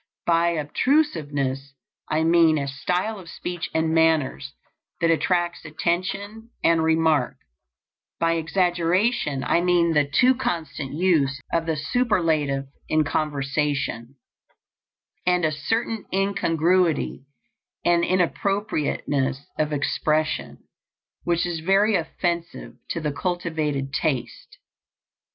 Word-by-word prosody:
By 170 0 +3
obtrusiveness 145 - 0 0.3
I 155 +1 +1
mean 165 -1 +4
a 140 -1 -2
style 180 +10 -2
of 175 -3 -12
speech 175 0 -5
and 160 0 0
manners 160 - +1 0.4
that 165 0 +3
attracts 175 +1 0
attention 185 +7 -3
and 165 -1 +4
remark; 160 -1 +2 0.8
by 165 0 +2
exaggeration 170 - +1
I 170 - +2
mean 175 -2 +3
the 150 -2 +4
too 255 - +4
constant 160 - -3
use 150 -5 +2
of 165 0 0
the 160 - 0
superlative 155 - 0 0.2
in 155 0 +3
conversation, 140 -4 -2 1.1
and 180 -2 +3
a 155 - +1
certain 225 +8 -2
incongruity 180 -6 +1 0.6
and 175 0 +3
inappropriateness 165 - 0
of 155 0 +1
expression 155 +1 -1 0.6
which 170 0 +1
is 175 -2 -3
very 195 +6 +3
offensive 170 -1 -2 0.2
to 170 - -2
the 150 -1 -1
cultivated 155 -4 -2
taste. 135 -3 -3
165 Hz, 105 wpm, -24 LUFS, 150-180 Hz, 1.1 s, mean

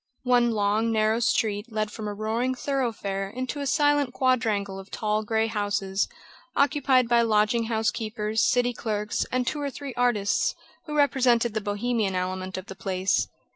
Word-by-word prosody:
One 245 -1 +4
long, 215 +1 +1
narrow 220 +1 +2
street 220 -1 0
led 215 -1 -1
from 215 -1 -6
a 205 - -3
roaring 225 +5 -1
thoroughfare 225 -8 -2
into 255 +6 -4
a 280 - -2
silent 290 -2 +2
quadrangle 220 -7 +1
of 195 0 -11
tall 215 0 -1
grey 220 0 0
houses, 205 -3 -1 0.5
occupied 280 -3 +3
by 235 0 +4
lodging 225 +1 +2
house 220 -1 +1
keepers, 220 0 -2
city 245 0 +2
clerks 210 -2 -2
and 255 0 0
two 295 +4 -2
or 285 - -1
three 275 -1 -7
artists, 235 -5 +1 0.3
who 300 - -4
represented 245 -5 +3
the 215 - -1
Bohemian 205 -1 -1
element 185 +1 -3
of 185 - -6
the 190 - -8
place. 190 0 0
225 Hz, 165 wpm, -26 LUFS, 205-245 Hz, 0.5 s, One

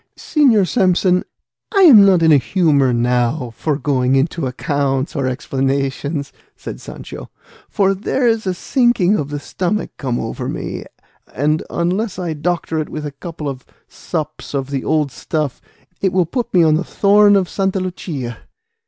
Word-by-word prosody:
"Señor 240 - +3
Samson, 185 -3 +2 0.5
I 395 - +3
am 265 - +9
not 185 -4 +4
in 160 - +5
a 150 - +7
humour 140 -2 +2
now 120 +2 0
for 150 +2 -1
going 135 -3 +1
into 140 +1 0
accounts 135 +2 -1
or 135 -3 0
explanations," 135 +2 -2 0.2
said - - -8
Sancho; - - -9 0.4
"for 195 -1 +2
there's 225 +2 0
a 185 - 0
sinking 240 -3 +2
of 145 -7 -2
the 145 0 -4
stomach 185 +8 -3
come 125 -4 -2
over 115 - -4
me, - - -5 0.5
and 150 +5 +1
unless 185 +5 -1
I 175 -3 -3
doctor 160 +1 -2
it 155 - -3
with 155 -1 -5
a 145 - -4
couple 155 +1 -7
of 130 -2 -5 0.2
sups 155 -3 -5
of 135 0 -3
the 135 -2 -2
old 150 -3 0
stuff 150 +1 -3 0.4
it 190 - +1
will 180 -1 +2
put 240 - -3
me 175 -2 +4
on 155 -1 +4
the 160 +4 +1
thorn 205 +2 +4
of 190 -2 +2
Santa 195 0 -1
Lucia. 150 -10 -5
160 Hz, 160 wpm, -18 LUFS, 140-190 Hz, 0.5 s, am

